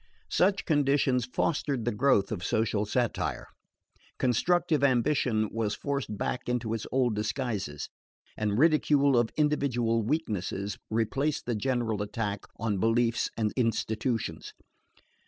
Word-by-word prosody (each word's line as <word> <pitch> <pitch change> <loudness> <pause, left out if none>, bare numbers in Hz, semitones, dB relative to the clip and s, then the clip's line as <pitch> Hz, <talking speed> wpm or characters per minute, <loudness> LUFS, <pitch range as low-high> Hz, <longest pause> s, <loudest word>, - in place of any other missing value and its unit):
Such 195 +2 +2
conditions 140 -4 +2
fostered 135 -2 -1
the 120 - +1
growth 105 -4 +2
of 95 -5 -3
social 105 0 0
satire. 120 +1 -1 0.7
Constructive 155 +4 +2
ambition 125 -4 +2
was 110 -2 -1
forced 140 -6 -3
back 125 +5 -3
into 120 -2 -1
its 115 - -4
old 125 -4 +2
disguises, 105 - -3 0.5
and 105 -1 -1
ridicule 145 -2 +4
of 120 -1 +3
individual 125 -7 +1
weaknesses 105 - -2
replaced 135 +7 0
the 120 - -1
general 115 -2 -1
attack 105 -1 -3
on 105 -3 -1
beliefs 115 +2 +2
and 110 -2 0
institutions. 115 -1 -1
120 Hz, 120 wpm, -28 LUFS, 110-140 Hz, 0.7 s, ridicule